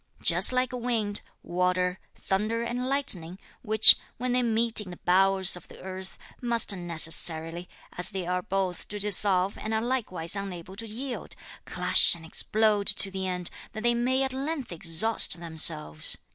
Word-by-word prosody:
Just - - +5
like 255 0 -1
wind, 230 -4 -3 0.2
water, 180 +1 -2 0.2
thunder 215 +4 -3
and 245 +2 -4
lightning, 185 -11 -1 0.2
which, 220 -1 +8 0.2
when 250 +1 -3
they 250 +1 +1
meet 230 -1 +3
in 200 - -10
the 175 - -10
bowels 190 0 +2
of 180 - -13
the - - -15
earth, 190 0 -9 0.2
must 235 -4 +1
necessarily, 165 0 0 0.3
as 180 - +1
they 190 -3 -6
are 180 +1 -2
both 190 -2 -4
to 210 - -5
dissolve 200 -1 +1
and 220 +1 -4
are 220 - -1
likewise 210 -9 -2
unable 190 -2 -8
to 225 +1 -7
yield, 245 +4 -7 0.3
clash - - +3
and 165 -1 -13
explode 210 +4 0
to 195 - +7
the 190 0 -5
end 180 -1 -3 0.2
that 215 0 -7
they 240 0 +2
may 255 +3 0
at 265 -1 -3
length 275 - -5
exhaust 170 +4 +2
themselves. 75 - -1
195 Hz, 160 wpm, -26 LUFS, 180-235 Hz, 0.3 s, which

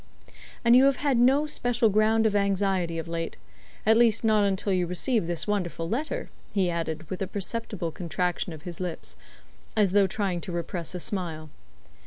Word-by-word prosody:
"And 235 +1 +7
you 260 +2 +7
have 275 -1 +4
had 275 -2 +1
no 270 +5 +4
special 245 -5 +1
ground 215 +2 +3
of 210 -2 +2
anxiety 195 -4 +1
of 165 - -4
late? 165 0 -4 0.5
At 220 +1 +6
least 230 -1 +4
not 215 -2 +4
until 195 0 0
you 180 -1 +1
received 180 +2 0
this 170 -1 -2
wonderful 180 -5 -2
letter" 310 - -3 0.2
he 185 -4 +1
added, 160 -2 -3
with 185 - -4
a 195 - -1
perceptible 205 -3 -3
contraction 180 0 -2
of 155 -2 -10
his 175 -2 -6
lips, 170 - -5 0.6
as 205 -4 +4
though 200 0 +4
trying 190 -3 -2
to 180 - -6
repress 170 +1 -4
a - - -3
smile. 160 -5 -4
195 Hz, 180 wpm, -27 LUFS, 170-220 Hz, 0.6 s, And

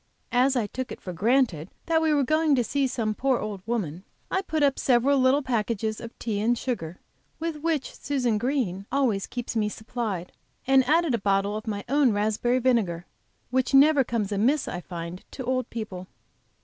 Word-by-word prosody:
As 255 +2 +3
I 240 -4 +1
took 260 +5 -5
it - - -7
for 180 - -7
granted 195 - +1 0.2
that 325 -1 +2
we 320 -1 +2
were 290 -2 +3
going 310 +2 +3
to 245 - +2
see 275 +4 0
some 225 -4 -1
poor 265 +3 +1
old 210 -4 -5
woman, 185 -8 -2 0.3
I 380 - +1
put 315 -5 -1
up 275 -1 +2
several 265 +2 +3
little 260 +3 +3
packages 220 -3 -1
of 235 0 -9
tea 215 -3 -2
and 235 +3 +2
sugar, 180 -11 -4 0.4
with 325 -1 -3
which 310 -2 -1
Susan 250 -6 0
Green 215 -7 -1
always 245 -8 +1
keeps 245 -1 -5
me 210 -2 +1
supplied, 220 -5 -4 0.3
and 265 0 +5
added 325 -2 +3
a 235 - +1
bottle 200 +1 +1
of 215 +1 -6
my 205 -2 -3
own 275 -3 +3
raspberry 220 +4 +1
vinegar, 220 -10 +1 0.5
which 260 +1 +1
never 285 0 +6
comes 225 -4 -2
amiss, 245 +9 +2
I 175 - -4
find, 170 0 -7
to 260 - -5
old 255 -1 -1
people. 195 -5 -6
240 Hz, 190 wpm, -26 LUFS, 205-270 Hz, 0.5 s, never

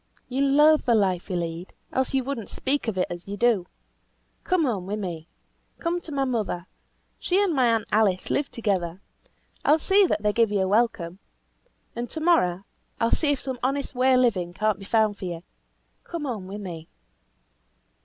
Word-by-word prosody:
you 265 +2 0
loathe 295 +3 +5
the 235 - +4
life 190 -4 +1
you 185 - -2
lead, 170 +1 -4 0.2
else 260 0 0
you 265 -1 +1
would 275 -1 -3
not 220 - -9
speak 275 -1 -1
of 215 -4 -2
it 180 - +2
as 175 +1 -8
you 200 +1 -5
do. 215 -6 +2 0.8
Come 365 -4 +2
home 200 -8 -2
with 210 +2 -2
me. 170 -5 -5 0.5
Come 345 +1 -2
to 325 - -9
my 275 -1 0
mother. 215 -8 -2 0.5
She 370 +2 +1
and 400 -4 +2
my 260 -4 +3
aunt 225 -2 0
Alice 205 -4 +2
live 280 0 0
together. 190 -6 -1 0.6
I - - 0
will - - +5
see 385 +4 +4
that 215 - -1
they 210 0 +2
give 230 -2 +3
you 200 -2 +1
a 190 - +1
welcome. 195 -4 +1 0.8
And 240 +1 -4
to 320 - -5
morrow 200 - +2 0.3
I - - -1
will 230 - 0
see 300 -3 +2
if 285 - -1
some 260 -2 -4
honest 275 +3 -1
way 255 +1 +3
of 255 - +4
living 185 -8 +1
cannot 215 -1 0
be 195 - -9
found 215 -1 +2
for - - -5
you. 170 -1 -5 0.6
Come 335 -3 -5
home 220 -8 -4
with 205 +2 -6
me." 165 -4 -7
225 Hz, 205 wpm, -25 LUFS, 185-275 Hz, 0.8 s, loathe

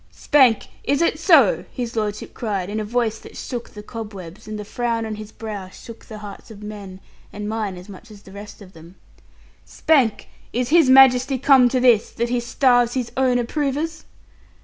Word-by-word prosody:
'Spank, 260 -7 +3 0.2
is 280 0 0
it 335 - +1
so?' - - +4
his 240 -3 -5
lordship 210 -1 -3
cried, 200 -4 -3
in 215 - -2
a - - -2
voice 225 0 -1
that - - -13
shook 240 -2 -6
the 210 - -11
cobwebs, 205 -5 -9
and 215 0 -5
the 210 - -7
frown 230 0 -2
on 220 - -4
his 215 0 -9
brow 205 -4 -7
shook 230 +4 -13
the 215 - -10
hearts 205 +2 -10
of 210 -2 -12
men, 200 -3 -9 0.3
and 210 0 -6
mine 210 -4 -3
as 180 +2 -12
much 205 +3 -13
as 205 -2 -14
the 190 - -15
rest 205 +1 -11
of 190 -1 -16
them, 165 +3 -15 0.7
'Spank, 270 -9 +1 0.2
is 245 +1 -2
His 320 -3 +5
Majesty 260 0 +6
come 255 -1 +5
to 255 - 0
this, 240 -4 +4
that 235 +1 -3
he 245 0 0
starves 245 0 +2
his 250 -3 -3
own 260 -2 +2
approvers?' 295 +5 -2
225 Hz, 195 wpm, -21 LUFS, 210-250 Hz, 0.7 s, Majesty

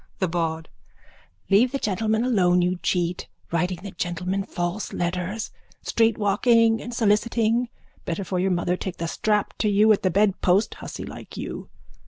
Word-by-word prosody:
THE 185 - 0
BAWD: 165 -1 -2 0.8
Leave 230 +6 +5
the 275 - -1
gentleman 220 0 0
alone, 180 -8 +3
you 180 +1 0
cheat. 175 -1 -1 0.2
Writing 175 +1 -1
the 200 - -6
gentleman 180 +3 -2
false 175 +2 -3
letters. 180 +5 -2 0.3
Streetwalking 225 +1 +3
and 240 - -6
soliciting. 230 +1 +1 0.3
Better 170 +4 -3
for 185 0 -2
your 190 +1 +1
mother 175 0 0
take 185 0 -5
the 170 - -3
strap 210 +4 0
to 215 - +2
you 210 +2 +5
at 200 - -1
the 185 - +2
bedpost, 195 0 +2
hussy - - -7
like - - -10
you. - - -6
195 Hz, 155 wpm, -24 LUFS, 180-220 Hz, 0.8 s, Leave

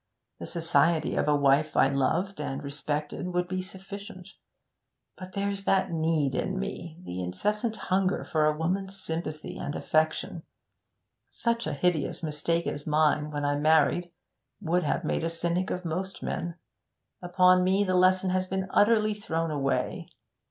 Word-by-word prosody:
The - - -6
society 165 -1 +2
of - - +1
a 150 - +4
wife 145 +2 +3
I - - +6
loved 165 +9 0
and 140 0 -4
respected 145 +4 -3
would 180 0 +1
be 185 0 -2
sufficient. 190 0 -9 0.9
But 185 -1 -10
there's 200 0 -2
that 190 -2 +2
need 160 -4 +1
in 190 +7 -1
me 175 -4 -5
the 90 - -5
incessant 210 - -1
hunger 190 -2 0
for 155 -1 +1
a 150 0 +1
woman's 190 +4 -2
sympathy 160 -3 -4
and 145 - -4
affection. 155 +2 0 0.9
Such 235 -3 -1
a 155 - -2
hideous 160 +1 0
mistake 165 +2 -1
as 145 +1 -4
mine 150 0 +2
when 145 -1 -3
I 145 0 +1
married 160 +3 +3 0.5
would 175 +2 +1
have 175 - -1
made 155 - -1
a 165 - 0
cynic 170 +2 -1
of 180 0 -3
most 180 +3 -4
men; 170 -1 -3 0.7
upon 180 0 +4
me 190 +2 +3
the 185 -2 0
lesson 185 +1 +4
has 185 0 0
been 190 0 -2
utterly 215 0 +4
thrown 165 -6 -2
away. 140 -2 -1
170 Hz, 155 wpm, -28 LUFS, 155-190 Hz, 0.9 s, I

